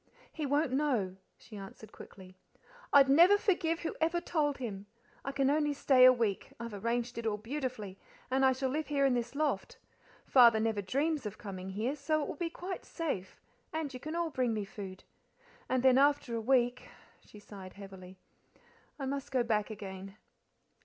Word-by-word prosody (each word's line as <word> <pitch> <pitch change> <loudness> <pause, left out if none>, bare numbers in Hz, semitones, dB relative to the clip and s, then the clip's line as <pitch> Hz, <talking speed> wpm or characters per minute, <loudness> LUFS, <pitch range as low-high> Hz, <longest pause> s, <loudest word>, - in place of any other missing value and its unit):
"He 305 -3 -4
won't 285 0 +1
know," 255 -10 0 0.2
she 220 - -14
answered 200 +2 -10
quickly. 185 -1 -13 0.6
"I'd 275 -1 +7
never 340 +9 +7
forgive 355 -6 0
whoever 335 +1 -1
told 295 -5 0
him. 205 -5 -6 0.4
I 275 - -3
can 275 -1 +1
only 295 0 +1
stay 265 -2 +5
a 255 - +10
week. 230 -6 -1
I've 235 -1 -6
arranged 235 +3 -2
it 230 - -3
all 210 -1 0
beautifully, 225 -4 -5 0.3
and 265 +1 +2
I 265 - +6
shall 260 0 -1
live 305 +2 -2
here 280 -1 +1
in 270 - +3
this 240 +2 -2
loft; 305 +1 -1 0.5
Father 235 -4 +6
never 220 -2 0
dreams 280 - -1
of 205 - -8
coming 190 -2 -7
here, 220 +8 -2
so 305 +1 0
it - - -4
will - - -5
be 345 -2 -3
quite 365 +3 -6
safe, 235 - -4 0.3
and 315 -3 -3
you 255 - -6
can 310 +5 -6
all 340 -1 -1
bring 250 -4 0
me 210 -2 -2
food. 195 -2 -9 0.7
And 255 -1 +1
then 260 0 +6
after 285 -3 +2
a 230 - -1
week" 245 +1 +1 0.3
she - - -16
sighed 195 -2 -11
heavily 190 -2 -11 0.8
"I 275 - -4
must 275 0 -3
go 255 -2 +1
back 215 -2 0
again." 195 -2 -8
255 Hz, 180 wpm, -32 LUFS, 210-290 Hz, 0.8 s, a